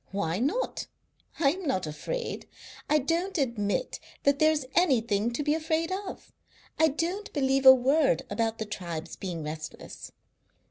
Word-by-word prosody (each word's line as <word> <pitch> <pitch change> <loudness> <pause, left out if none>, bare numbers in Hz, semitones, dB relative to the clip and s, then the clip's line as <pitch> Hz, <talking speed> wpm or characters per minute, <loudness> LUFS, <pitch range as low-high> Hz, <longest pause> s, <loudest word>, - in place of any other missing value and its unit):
Why 190 -3 -1
not? 310 - -1 0.5
I 275 -4 +4
am 360 0 -5
not 185 -10 0
afraid. 465 - -4 0.4
I 300 - +5
don't 335 +7 -1
admit 235 - -1 0.2
that 280 0 +3
there 310 0 +5
is 295 -4 -1
anything 230 - +2
to 295 - -2
be 295 +1 +2
afraid 320 +2 -1
of. 385 +1 -6 0.5
I 320 - +6
don't 340 +7 -2
believe 270 -1 +2
a 260 - +12
word 265 - +2
about 225 +2 -1
the 220 - -3
tribes 170 -5 -6
being 175 -4 -5
restless. 155 +1 -7
270 Hz, 150 wpm, -28 LUFS, 205-320 Hz, 0.5 s, a